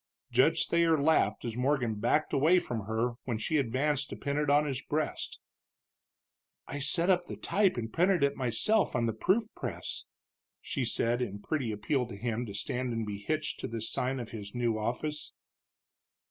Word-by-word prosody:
Judge -, -, +4 dB
Thayer 170 Hz, -2 st, +3 dB
laughed 155 Hz, -2 st, +2 dB
as 115 Hz, -2 st, -3 dB
Morgan 125 Hz, -2 st, +1 dB
backed 120 Hz, +9 st, +1 dB
away 160 Hz, +7 st, +5 dB
from 115 Hz, -, -2 dB
her 115 Hz, +2 st, -1 dB
when 120 Hz, -4 st, -1 dB
she 130 Hz, +8 st, 0 dB
advanced 140 Hz, +2 st, 0 dB
to -, -, -5 dB
pin 140 Hz, 0 st, -3 dB
it 150 Hz, -1 st, 0 dB
on 145 Hz, +1 st, +5 dB
his 135 Hz, -2 st, -2 dB
breast. 155 Hz, 0 st, -3 dB, 1.3 s
"I 145 Hz, -, -5 dB
set 170 Hz, +6 st, +2 dB
up 175 Hz, -1 st, +1 dB
the -, -, -6 dB
type 195 Hz, -6 st, +2 dB
and 115 Hz, -2 st, -4 dB
printed 180 Hz, -2 st, +3 dB
it 140 Hz, 0 st, +2 dB
myself 130 Hz, -, +1 dB
on 120 Hz, -1 st, +2 dB
the 115 Hz, -, 0 dB
proof 210 Hz, -, +1 dB
press," -, -, -5 dB, 0.5 s
she 135 Hz, -4 st, -2 dB
said, 120 Hz, +1 st, +1 dB
in 100 Hz, -5 st, -2 dB
pretty 130 Hz, +1 st, -2 dB
appeal 120 Hz, +5 st, 0 dB
to 115 Hz, -, -8 dB
him 115 Hz, +3 st, -2 dB
to 100 Hz, -, -7 dB
stand 125 Hz, +3 st, -2 dB
and 115 Hz, -1 st, -2 dB
be 100 Hz, -1 st, -5 dB
hitched 155 Hz, +9 st, -2 dB
to -, -, -3 dB
this 115 Hz, -1 st, -4 dB
sign 130 Hz, +1 st, -1 dB
of 120 Hz, -, -6 dB
his 105 Hz, -1 st, -8 dB
new 120 Hz, -2 st, +1 dB
office. 125 Hz, +8 st, -3 dB
125 Hz, 185 wpm, -30 LUFS, 115-150 Hz, 1.3 s, away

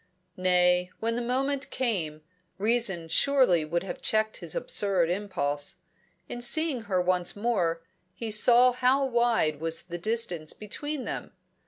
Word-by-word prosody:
Nay, 180 Hz, 0 st, +3 dB
when 230 Hz, +1 st, -1 dB
the 240 Hz, -, -1 dB
moment 270 Hz, +3 st, -1 dB
came, 165 Hz, -12 st, -2 dB, 0.3 s
reason 205 Hz, -5 st, +1 dB
surely 255 Hz, -, +3 dB
would 170 Hz, +3 st, -2 dB
have 190 Hz, -, -7 dB
checked 220 Hz, 0 st, +1 dB
his -, -, -4 dB
absurd 200 Hz, -, +1 dB
impulse. 155 Hz, -7 st, -2 dB, 0.5 s
In 240 Hz, -, -6 dB
seeing 265 Hz, -1 st, +1 dB
her 185 Hz, -2 st, +2 dB
once 180 Hz, 0 st, 0 dB
more, 185 Hz, -7 st, -1 dB, 0.3 s
he 230 Hz, -2 st, -5 dB
saw 240 Hz, +4 st, +5 dB
how 255 Hz, +2 st, +2 dB
wide 235 Hz, -, +1 dB
was 165 Hz, +1 st, -1 dB
the 175 Hz, 0 st, -7 dB
distance 180 Hz, -6 st, -2 dB
between 290 Hz, +7 st, -4 dB
them. -, -, -5 dB
210 Hz, 140 wpm, -27 LUFS, 175-245 Hz, 0.5 s, saw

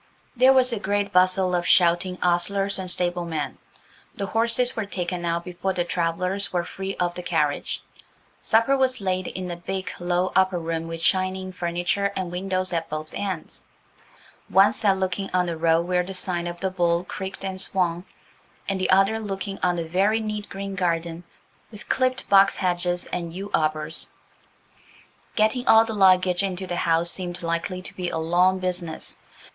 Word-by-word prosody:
There 255 Hz, +2 st, +6 dB
was 255 Hz, -2 st, +4 dB
a 225 Hz, -, -2 dB
great 205 Hz, 0 st, -1 dB
bustle 185 Hz, 0 st, +4 dB
of 175 Hz, -1 st, 0 dB
shouting 180 Hz, +1 st, +3 dB
ostlers 195 Hz, +3 st, +1 dB
and 185 Hz, -1 st, -5 dB
stablemen; 175 Hz, -3 st, -2 dB, 0.6 s
the 200 Hz, -, -3 dB
horses 230 Hz, +4 st, +2 dB
were 220 Hz, -3 st, -3 dB
taken 180 Hz, -2 st, -3 dB
out 170 Hz, 0 st, -1 dB
before 180 Hz, +1 st, -3 dB
the 175 Hz, -, 0 dB
travellers 180 Hz, +3 st, -1 dB
were 175 Hz, -1 st, 0 dB
free 195 Hz, +2 st, -5 dB
of 175 Hz, -1 st, -1 dB
the 180 Hz, -, -6 dB
carriage. 150 Hz, -5 st, -1 dB, 0.6 s
Supper 230 Hz, +5 st, +3 dB
was 260 Hz, -1 st, +1 dB
laid 185 Hz, -2 st, -1 dB
in 185 Hz, -1 st, -5 dB
a -, -, -3 dB
big, 190 Hz, +2 st, -4 dB
low, 175 Hz, +1 st, 0 dB
upper 190 Hz, -1 st, +3 dB
room, 165 Hz, -1 st, -3 dB
with 165 Hz, 0 st, -6 dB
shining 185 Hz, 0 st, +1 dB
furniture 175 Hz, +3 st, -1 dB
and 185 Hz, -2 st, -3 dB
windows 185 Hz, 0 st, -2 dB
at 165 Hz, -1 st, -2 dB
both 155 Hz, +1 st, -5 dB
ends, 190 Hz, -5 st, -5 dB, 0.8 s
one 195 Hz, +2 st, +5 dB
set 200 Hz, -3 st, +2 dB
looking 190 Hz, +1 st, -2 dB
on 180 Hz, 0 st, +3 dB
the 170 Hz, -1 st, -3 dB
road 165 Hz, +1 st, +2 dB
where 180 Hz, 0 st, +1 dB
the 190 Hz, +2 st, -6 dB
sign 175 Hz, -2 st, -2 dB
of 175 Hz, 0 st, -6 dB
the 190 Hz, -, -1 dB
"Bull" 175 Hz, -1 st, +1 dB
creaked 190 Hz, +1 st, -6 dB
and 190 Hz, -1 st, -2 dB
swung, 175 Hz, -3 st, 0 dB, 0.6 s
and 195 Hz, -1 st, -1 dB
the 185 Hz, -, 0 dB
other 195 Hz, +4 st, +4 dB
looking 195 Hz, -2 st, -5 dB
on 180 Hz, -1 st, +1 dB
a 170 Hz, -, -1 dB
very 195 Hz, +7 st, +1 dB
neat 215 Hz, -1 st, -4 dB
green 195 Hz, 0 st, -5 dB
garden, 170 Hz, -2 st, -1 dB, 0.5 s
with 210 Hz, -2 st, -12 dB
clipped 255 Hz, 0 st, +1 dB
box 195 Hz, 0 st, +6 dB
hedges 175 Hz, -1 st, -1 dB
and 170 Hz, -2 st, -3 dB
yew 195 Hz, +3 st, -6 dB
arbours. 155 Hz, 0 st, -1 dB, 1.3 s
Getting 220 Hz, +4 st, +1 dB
all 225 Hz, 0 st, +7 dB
the 225 Hz, -, -4 dB
luggage 185 Hz, -2 st, +4 dB
into 190 Hz, -1 st, -3 dB
the 175 Hz, -, -3 dB
house 170 Hz, 0 st, +2 dB
seemed 175 Hz, -2 st, -4 dB
likely 170 Hz, +2 st, -2 dB
to -, -, -7 dB
be 180 Hz, -1 st, -3 dB
a -, -, -3 dB
long 175 Hz, +3 st, +3 dB
business. 180 Hz, -3 st, -4 dB
185 Hz, 175 wpm, -24 LUFS, 175-195 Hz, 1.3 s, all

